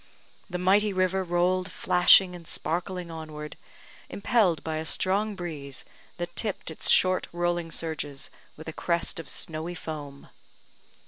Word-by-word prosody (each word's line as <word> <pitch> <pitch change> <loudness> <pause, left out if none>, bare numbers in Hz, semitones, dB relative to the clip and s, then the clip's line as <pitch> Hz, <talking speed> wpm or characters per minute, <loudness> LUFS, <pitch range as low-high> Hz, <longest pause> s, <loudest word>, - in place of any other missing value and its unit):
The 180 - -3
mighty 200 +4 +3
river 185 0 +1
rolled 180 +1 +1
flashing 180 +1 +6
and 170 -2 -11
sparkling 175 +1 -2
onward, 155 -2 -7 0.5
impelled 200 - +2
by 160 -1 -2
a 155 - -2
strong 200 +5 0
breeze, 150 -7 -5 0.3
that 175 0 -5
tipped 205 -6 -1
its 160 - 0
short 185 0 +4
rolling 175 -1 -1
surges 150 -4 -3 0.3
with 160 - -10
a 160 - -5
crest 170 0 0
of 165 - -7
snowy 160 +2 -2
foam. 145 -4 -7
175 Hz, 135 wpm, -27 LUFS, 160-185 Hz, 0.5 s, flashing